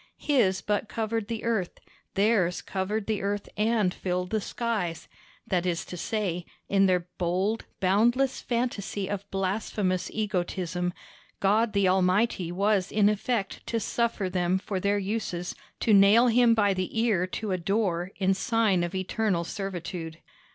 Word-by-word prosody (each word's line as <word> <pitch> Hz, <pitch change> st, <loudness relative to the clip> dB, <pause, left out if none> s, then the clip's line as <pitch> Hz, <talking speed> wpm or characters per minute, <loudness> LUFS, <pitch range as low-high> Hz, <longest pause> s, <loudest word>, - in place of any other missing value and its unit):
His 230 Hz, -11 st, +2 dB
but 210 Hz, +1 st, -1 dB
covered 225 Hz, -1 st, -2 dB
the 225 Hz, -1 st, -4 dB
earth; 220 Hz, -6 st, -1 dB, 0.4 s
theirs 195 Hz, -4 st, +2 dB
covered 200 Hz, +2 st, -2 dB
the 215 Hz, -1 st, -1 dB
earth 200 Hz, +1 st, -2 dB
and 210 Hz, -3 st, +2 dB
filled 180 Hz, 0 st, -2 dB
the 215 Hz, -1 st, +1 dB
skies; 205 Hz, -8 st, -3 dB, 0.4 s
that 180 Hz, -2 st, 0 dB
is 175 Hz, -2 st, -1 dB
to -, -, -7 dB
say, 180 Hz, -2 st, -2 dB, 0.2 s
in 195 Hz, 0 st, +4 dB
their 180 Hz, -1 st, +3 dB, 0.2 s
bold, 185 Hz, +5 st, 0 dB
boundless 235 Hz, +8 st, +2 dB
fantasy 230 Hz, -5 st, -2 dB
of 200 Hz, 0 st, -4 dB
blasphemous 195 Hz, -1 st, -1 dB
egotism, 180 Hz, -4 st, -2 dB, 0.5 s
God 215 Hz, +3 st, +2 dB
the 200 Hz, -2 st, +3 dB
Almighty 185 Hz, 0 st, +2 dB
was 195 Hz, +1 st, +1 dB
in 205 Hz, -1 st, +4 dB
effect 210 Hz, -1 st, -2 dB
to 230 Hz, -, 0 dB
suffer 230 Hz, -2 st, -1 dB
them 180 Hz, 0 st, +1 dB
for 190 Hz, 0 st, -3 dB
their 200 Hz, +2 st, +1 dB
uses 195 Hz, -3 st, -3 dB, 0.3 s
to 220 Hz, -, +3 dB
nail 205 Hz, +5 st, +7 dB
him 235 Hz, 0 st, +5 dB
by 205 Hz, -3 st, +3 dB
the 185 Hz, +4 st, -2 dB
ear 210 Hz, -6 st, +2 dB
to 210 Hz, +2 st, -4 dB
a 185 Hz, -, +1 dB
door 180 Hz, -2 st, 0 dB
in 195 Hz, -1 st, +2 dB
sign 205 Hz, -2 st, +2 dB
of 175 Hz, +2 st, -3 dB
eternal 185 Hz, -1 st, 0 dB
servitude. 175 Hz, -4 st, -5 dB
200 Hz, 150 wpm, -27 LUFS, 185-220 Hz, 0.5 s, nail